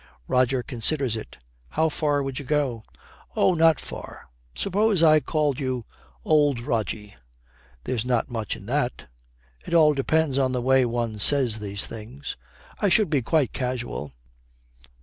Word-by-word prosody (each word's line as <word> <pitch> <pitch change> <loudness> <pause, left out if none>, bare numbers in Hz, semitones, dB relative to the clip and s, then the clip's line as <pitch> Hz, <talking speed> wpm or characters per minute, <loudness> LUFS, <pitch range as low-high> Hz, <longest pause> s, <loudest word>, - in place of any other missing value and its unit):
Roger 125 0 +2
considers 125 +1 0
it. 110 - -8 0.3
'How 160 - +1
far 145 -2 0
would 135 -1 -4
you 140 - -8
go?' 135 -5 0 0.5
'Oh, 185 - +3
not 165 -2 +4
far. - - -10 0.3
Suppose 200 -2 +1
I 155 -1 +7
called 150 -1 -1
you 130 -4 -3 0.4
"Old 145 -4 +3
Rogie"? 110 -4 -3 0.7
There's 115 - -2
not 125 -2 0
much 115 -4 -4
in 105 -3 -12
that.' 125 +1 -2 0.6
'It 170 - -2
all 155 -2 +6
depends 145 0 +1
on 130 -1 +1
the 125 - 0
way 130 0 +4
one 115 -2 -2
says 125 -2 +4
these 100 -1 -2
things.' 115 +6 -7 0.4
'I 205 - +2
should 210 +3 +3
be 145 -4 +2
quite 145 +1 +1
casual.' 125 - -4
130 Hz, 150 wpm, -25 LUFS, 120-150 Hz, 0.7 s, I